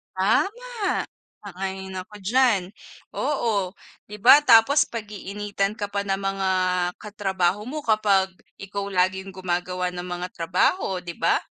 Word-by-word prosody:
Tama. 415 - 0 0.4
Sang-ayon 190 0 -5
ako 210 +3 -10
diyan. 240 -1 +3 0.6
Oo. 210 -10 0 0.3
'Di 210 - -8
ba 290 - +9
tapos 275 +6 +6
pag-iinitan 205 -2 -3
ka 205 -2 -4
pa 200 0 -2
ng 195 - +1
mga 195 -1 -1 0.5
katrabaho 200 -1 -1
mo 300 +3 -4
kapag 200 -4 +2 0.2
ikaw 200 0 -5
laging 190 0 0
gumagawa 180 0 -2
ng 180 0 -6
mga 180 0 -4
trabaho, 180 - 0
'di 170 -1 -7
ba? - - +2
195 Hz, 125 wpm, -24 LUFS, 185-215 Hz, 0.6 s, ba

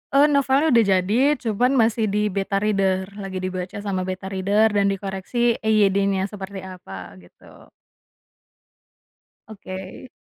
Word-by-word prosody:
E - - +6
novelnya 280 +2 +2
udah 230 -3 +5
jadi 190 +4 +2 0.2
cuman 240 +3 +1
masih 225 -2 +2
di 210 +1 0
beta 195 0 -1
reader 195 -2 0
lagi 190 -2 -5
dibaca 185 0 -4
sama 190 -2 -2
beta 190 +1 -5
reader 200 +3 +2
dan 200 -1 +2
dikoreksi 195 +5 -1
EYD-nya 200 -2 +2
seperti 195 -2 -7
apa 95 - -9
gitu. 90 -1 -18 1.8
Oke. 190 +2 -9
195 Hz, 125 wpm, -22 LUFS, 190-220 Hz, 1.8 s, E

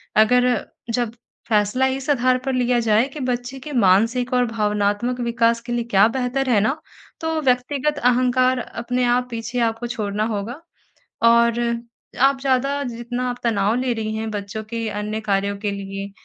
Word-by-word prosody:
अगर 245 +2 +3 0.3
जब 235 -1 -1 0.4
फ़ैसला 210 +4 +2
इस 265 +1 -3
आधार 255 -2 +3
पर 270 - 0
लिया 250 -1 +2
जाए 225 +2 +3
कि 295 - -9
बच्चे 250 0 -3
के 295 +3 -8
मानसिक 230 +4 +3
और 250 0 +3
भावनात्मक 210 +2 0
विकास 235 -1 +2
के 240 - -8
लिए 240 0 0
क्या 200 +2 +6
बेहतर 260 +2 -1
है 225 -4 +4
ना 220 +7 +1 0.5
तो 320 0 -1
व्यक्तिगत 275 +2 0
अहंकार 255 +1 +3
अपने 245 +1 -3
आप 245 +1 +2
पीछे 230 +1 -3
आपको 225 +2 -4
छोड़ना 210 -3 -2
होगा। 220 +4 -4 0.6
और 235 0 +4 0.6
आप 270 0 +4
ज़्यादा 275 +1 +1
जितना 245 0 -4
आप 245 - -5
तनाव 210 -2 +2
ले 255 -1 0
रही 220 -1 -3
हैं 220 0 -3
बच्चों 205 +1 -5
के 230 -1 -2
अन्य 210 +1 -3
कार्यों 200 0 +1
के 205 0 -2
लिए 195 0 -6
240 Hz, 165 wpm, -21 LUFS, 215-255 Hz, 0.6 s, क्या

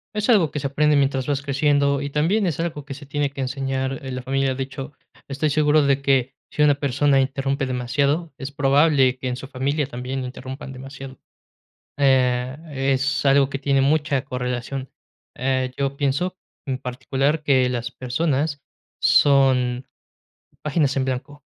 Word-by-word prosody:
Es 210 -1 -1
algo 195 -10 +5
que 145 - -4
se 140 - -6
aprende 150 +2 +2
mientras 135 -2 +1
vas 140 -1 -1
creciendo, 140 0 +2
y 145 - -3
también 180 +8 +1
es 165 - -2
algo 160 -4 -3
que 135 -1 -8
se 145 0 -11
tiene 145 0 -1
que 140 0 -7
enseñar 135 +1 -2
en 130 -1 -5
la 125 - -5
familia. 135 0 0
De 135 - -2
hecho, 135 +2 -8 0.3
estoy 145 +2 -1
seguro 150 0 +4
de 140 0 +2
que 135 -1 +2 0.2
si 150 - +1
una 145 -1 +6
persona 140 0 +2
interrumpe 135 0 -1
demasiado, 140 +6 0
es 135 +1 -5
probable 140 -2 +3
que 130 - -4
en 125 - -1
su 130 +1 -8
familia 140 +3 -1
también 130 +1 -5
la - - -4
interrumpan 130 +1 -8
demasiado, 135 0 -10 0.8
eh, 130 -2 +2 0.2
es 135 +1 0
algo 135 0 +4
que 135 - -4
tiene 135 -1 +2
mucha 145 -1 +1
correlación. 125 +1 -4 0.5
Eh, 130 0 -1
yo 140 0 -1
pienso 150 +7 -1 0.3
en 135 -3 -2
particular 135 +4 -1
que 130 -3 +3
las 120 -1 -3
personas 145 +3 -1 0.4
son 130 -3 +4 0.8
páginas 150 -2 +1
en 130 - 0
blanco. 135 +3 -4
135 Hz, 165 wpm, -22 LUFS, 130-145 Hz, 0.8 s, una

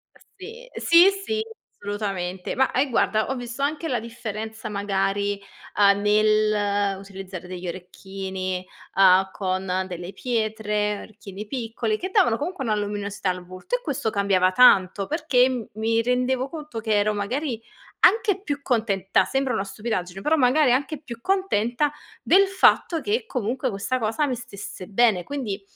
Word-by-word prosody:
Uh, - - -21 0.2
sì. 460 +6 -10
Sì, 340 +3 +6 0.2
sì, 440 0 -1 0.4
assolutamente. 195 -3 -4
Ma 265 0 +2
eh, 265 +2 +1
guarda, 220 -2 +1
ho 265 - -1
visto 245 +1 -6
anche 305 +3 -1
la 250 -4 0
differenza, 220 -1 -6
magari, 200 0 -1 0.4
uhm, 200 -1 +5
nell'utilizzare 205 -3 0
degli 180 0 -6
orecchini, 185 +1 -5 0.3
uhm, 190 0 +6
con 185 -1 -2
delle 180 +1 -7
pietre. 210 -2 -1
Orecchini 210 -1 -10
piccoli, 225 -2 -2
che 375 - -4
davano 235 -10 +3
comunque 310 0 -4
una 220 -4 +1
luminosità 205 -1 -3
al 180 0 -4
volto. 185 - -4
E - - -4
questo 275 - -2
cambiava 195 -3 +2
tanto. 195 -3 +5
Perché 290 -5 +3
m 245 -4 -4
mi 225 +2 +1
rendevo 250 +2 0
conto 300 -7 -7
che 220 -1 -1
ero, 210 +1 +2
magari, 235 +4 -3 0.4
anche 405 -1 +4
più 290 -7 -3
contenta, 210 -7 +1
sembra 270 -2 -1
una 200 -3 -1
stupidaggine, 195 -2 -4
però 315 +8 +2
magari 265 +1 +4
anche 280 +4 0
più 235 -6 -9
contenta 295 - +1 0.3
del 390 +2 +5
fatto 375 -3 +3
che, 440 +3 -1
comunque, 255 - -2
questa 210 +5 -2
cosa 225 +6 0
mi 260 -3 -1
stesse 200 -5 -9
bene. 210 -3 +3
Quindi 235 -9 -4
215 Hz, 150 wpm, -24 LUFS, 195-265 Hz, 0.4 s, Sì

